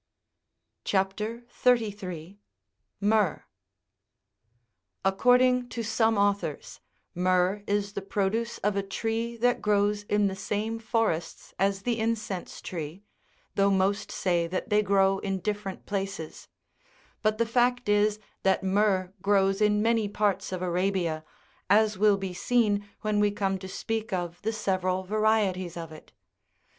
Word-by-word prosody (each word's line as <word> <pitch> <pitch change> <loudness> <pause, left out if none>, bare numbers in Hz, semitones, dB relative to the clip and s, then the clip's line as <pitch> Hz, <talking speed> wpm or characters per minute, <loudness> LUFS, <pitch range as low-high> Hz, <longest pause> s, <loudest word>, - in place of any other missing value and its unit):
CHAP. 195 -1 +1 0.4
33. 205 -8 -1 0.6
(15.) 200 - 0
HYEEH. 210 -7 +2 1.6
According 250 +5 +4
to 235 - -4
some 220 0 +2
authors, 200 0 -1 0.4
myrrh13 185 +3 +2
is 205 0 0
the 200 - -3
produce 205 +4 -1
of 205 0 +1
a 200 - +1
tree 225 +4 -3
that 245 +1 +2
grows 205 0 +2
in 205 0 +2
the 195 -1 0
same 210 +3 -2
forests 220 -7 -2
as 195 +1 +1
the 240 -2 0
incense 220 -4 -3
tree, 165 +2 -6 0.5
though 200 0 +3
most 195 +1 +1
say 175 -3 0
that 185 +6 -4
they 210 0 +5
grow 195 -1 +3
in 195 -1 -2
different 205 0 -4
places: 195 -5 -4 0.7
but 215 0 +1
the 230 - +2
fact 245 +1 +1
is 210 0 +3 0.2
that 190 0 +2
myrrh 190 -1 +1
grows 195 0 +2
in 210 0 +3
many 225 -2 +2
parts 205 -2 0
of 185 -1 -3
Arabia, 180 -3 0 0.5
as 210 0 +4
will 205 -1 +5
be 190 -2 -4
seen 205 0 +1
when 215 -1 0
we 205 0 +4
come 195 -2 -1
to 190 - -8
speak 220 +3 -3
of 175 -2 -3
the 220 - -1
several 185 -3 -1
varieties 200 -4 +1
of 165 -1 -6
it. 155 - -13
200 Hz, 135 wpm, -27 LUFS, 190-215 Hz, 1.6 s, they